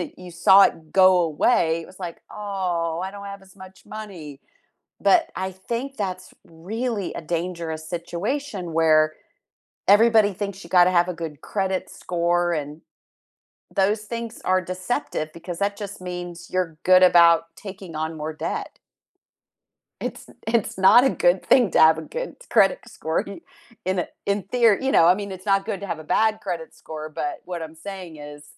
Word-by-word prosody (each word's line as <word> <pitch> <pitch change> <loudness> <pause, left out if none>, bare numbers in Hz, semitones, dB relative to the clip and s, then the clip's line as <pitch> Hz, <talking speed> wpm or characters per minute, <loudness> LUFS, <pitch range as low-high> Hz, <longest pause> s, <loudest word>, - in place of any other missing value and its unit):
and 175 - -5
you 180 -1 -11
saw 190 +4 +6
it 160 -4 0
go 185 -1 +6
away, 165 0 +2
it - - -12
was 185 - -16
like, 175 -2 -6
"Oh, 180 -5 -2
I 190 - -4
don't 200 0 -10
have 200 0 -8
as 190 +1 -19
much 190 0 -14
money." 175 -10 -9 0.6
But 350 -2 +4
I 190 0 -3
think 235 +9 -5
that's 185 -2 -4
really 205 +5 -4
a - - -5
dangerous 165 -1 -4
situation 180 - -4
where 155 -1 +4 0.7
everybody 215 0 +5
thinks 200 0 -5
you 170 - -13
gotta 180 0 +5
have 175 -1 +3
a - - -2
good 160 -3 -7
credit 190 -2 -2
score 175 0 0
and 150 0 -5 0.9
those 205 +2 +2
things 230 +1 -6
are 185 0 +3
deceptive 185 - -3
because 170 0 -7
that 200 0 0
just 200 -2 -7
means 175 -1 -7
you're 180 -4 -2
good 185 0 +6
about 170 -2 +6
taking 190 -5 -9
on 160 +1 -3
more 155 +1 -4
debt. 155 - -5 1.2
It's - - -6 0.2
it's 225 -4 0
not 190 +6 +7
a 270 - +4
good - - +2
thing 240 -8 +4
to - - +3
have 160 0 +7
a 160 - -4
good - - -6
credit 195 -4 +4
score 160 +1 -2 0.6
in 185 -1 0 0.2
in 200 0 0
theor 230 0 +3
you 265 0 0
know, 165 - +6
I 180 +2 +6
mean, 200 -1 -6
it's 190 +1 -9
not 195 -1 +2
good 210 -4 -3
to 200 - -5
have 170 -3 -4
a - - -9
bad 215 +6 +1
credit 170 -4 -5
score, 155 0 -8
but 150 -2 -4
what 175 -2 -5
I'm 160 0 -8
saying 180 -1 -8
is, 145 0 -10
185 Hz, 175 wpm, -23 LUFS, 165-200 Hz, 1.2 s, not